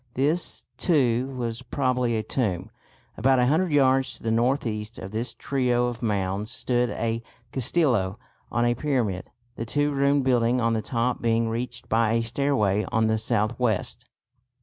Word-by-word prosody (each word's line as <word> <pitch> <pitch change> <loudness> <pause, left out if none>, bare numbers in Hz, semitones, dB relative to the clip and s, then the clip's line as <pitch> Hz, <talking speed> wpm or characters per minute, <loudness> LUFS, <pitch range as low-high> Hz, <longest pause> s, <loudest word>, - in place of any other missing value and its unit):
This, 150 +7 0
too, 130 -7 +2
was 120 -1 -3
probably 125 -2 0
a 110 - -2
tomb. 105 -4 -2 0.5
About 135 0 +3
a 125 - +4
hundred 160 +6 +2
yards 135 -2 +3
to - - -20
the 115 - 0
north 125 +5 +1
east 105 0 -4
of 95 - -7
this 115 +3 -3
trio 125 -3 +1
of 120 -1 -4
mounds 100 -2 -1
stood 120 0 0
a 115 -1 -2 0.3
castillo 120 - +2 0.3
on 120 0 +1
a 120 - +3
pyramid, 120 -9 -1 0.3
the 115 - -3
two 145 +4 +1
roomed 140 0 +2
building 125 -1 +2
on 115 -1 +1
the 110 - 0
top 120 +2 -1
being 115 0 +1
reached 120 +1 -4
by 115 0 +2
a 115 0 +1
stairway 115 -5 +1
on 110 0 +2
the 110 0 +1
south 110 +1 0
west. 120 0 -1
120 Hz, 170 wpm, -25 LUFS, 115-130 Hz, 0.5 s, a